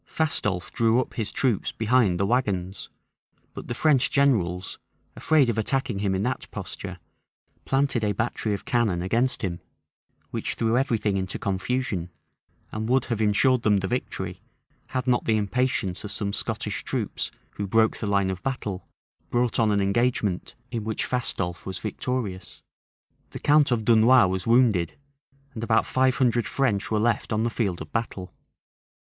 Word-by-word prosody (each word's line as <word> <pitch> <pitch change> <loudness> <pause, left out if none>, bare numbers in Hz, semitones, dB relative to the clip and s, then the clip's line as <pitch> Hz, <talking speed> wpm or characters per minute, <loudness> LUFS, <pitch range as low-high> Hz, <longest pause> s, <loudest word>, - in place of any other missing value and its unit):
Fastolffe 105 - 0
drew 115 +1 +3
up 130 - -3
his 105 -3 -2
troops 120 -7 0
behind 110 -5 +2
the 100 - +2
wagons; 100 -5 -1 0.6
but - - -8
the 120 - -3
French 140 -3 +3
generals, 95 -11 +1 0.4
afraid 155 -5 +3
of 115 -2 0
attacking 130 -1 -1
him 100 -1 0
in 95 - -1
that 125 +2 -3
posture, 95 -1 -6 0.7
planted 135 -4 +1
a 105 - +2
battery 110 0 -1
of 100 - -9
cannon 110 -8 +1
against 115 +8 0
him; 85 -3 -2 0.7
which - - -3
threw 115 0 +1
every 125 -2 +2
thing 105 -2 0
into 95 -1 -2
confusion, 100 -2 -2 0.6
and 110 +1 -3
would 130 0 +3
have 115 -3 -2
insured 115 +4 +3
them 105 -2 +3
the 95 0 -1
victory, 125 +5 -4 0.5
had 130 -1 -2
not 125 -2 +2
the 110 -1 +2
impatience 105 -3 0
of 105 - -6
some 100 -1 -2
Scottish - - -3
troops, - - -3 0.2
who 100 - -4
broke 110 +2 +3
the 105 - -3
line 100 -2 +2
of 95 -1 -6
battle, 105 -7 -4 0.4
brought 120 -1 +1
on 110 -2 +3
an 100 -1 +2
engagement, 100 -2 0 0.2
in 115 -3 -3
which 110 0 -2
Fastolffe 95 -8 -2
was 95 - -5
victorious. 110 -4 -4 0.7
The - - -8
count 150 0 +4
of 115 -4 0
Dunois 115 +2 +6
was 95 +1 -2
wounded; 115 -8 +3 0.6
and 110 - -5
about 110 -1 +3
five 130 0 +2
hundred 120 -4 +2
French 110 -5 0
were 110 - +1
left 115 +1 0
on 110 0 +1
the 115 - 0
field 100 -7 -1
of - - -17
battle. 105 -5 -3
110 Hz, 165 wpm, -25 LUFS, 100-125 Hz, 0.7 s, Dunois